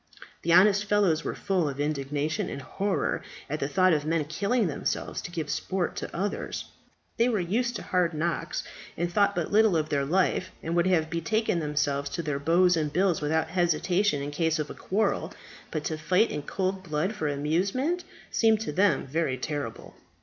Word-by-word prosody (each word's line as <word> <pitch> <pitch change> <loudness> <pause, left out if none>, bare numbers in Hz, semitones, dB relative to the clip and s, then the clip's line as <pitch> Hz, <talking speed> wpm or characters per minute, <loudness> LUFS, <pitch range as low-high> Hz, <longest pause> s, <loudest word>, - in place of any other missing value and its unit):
The 170 - 0
honest 200 +4 +6
fellows 200 -6 +2
were - - -3
full 180 -6 0
of 140 0 -7
indignation 145 +1 -1
and - - -5
horror 195 +9 -1 0.3
at 155 +2 -3
the 135 - -1
thought 185 +3 +3
of 150 -2 +1
men 155 0 0
killing 205 - 0
themselves 155 -5 -2
to - - -7
give 160 -4 -3
sport 175 +5 -2
to - - -4
others. 200 +4 -3 0.5
They 235 +2 +3
were 220 -4 +1
used 235 +8 0
to - - -5
hard 175 -3 +1
knocks, 165 +2 -2 0.3
and 175 +1 -2
thought 200 0 +3
but 170 -3 -2
little 210 -4 +5
of 155 0 -1
their 140 -2 +1
life, 185 +4 +1
and 165 +1 -2
would 175 +1 +3
have 160 -4 +2
betaken 175 +3 0
themselves 145 -2 -1
to 170 - -2
their 150 -2 -2
bows 175 +4 +4
and 155 -2 -1
bills 180 0 +2
without 160 +2 0
hesitation 175 -1 +1
in 145 - -4
case 160 +1 +1
of 150 -1 -3
a - - -5
quarrel. 210 +4 -1 0.3
But 155 -2 -3
to 155 0 -3
fight 180 +8 +2
in 150 - -3
cold 190 +5 -2
blood 170 +3 -1
for 200 -8 -2
amusement 195 - 0 0.3
seemed 220 -2 +3
to 220 - -3
them 190 +2 +2
very 135 -1 -1
terrible. 140 -3 -5
170 Hz, 190 wpm, -27 LUFS, 150-195 Hz, 0.5 s, honest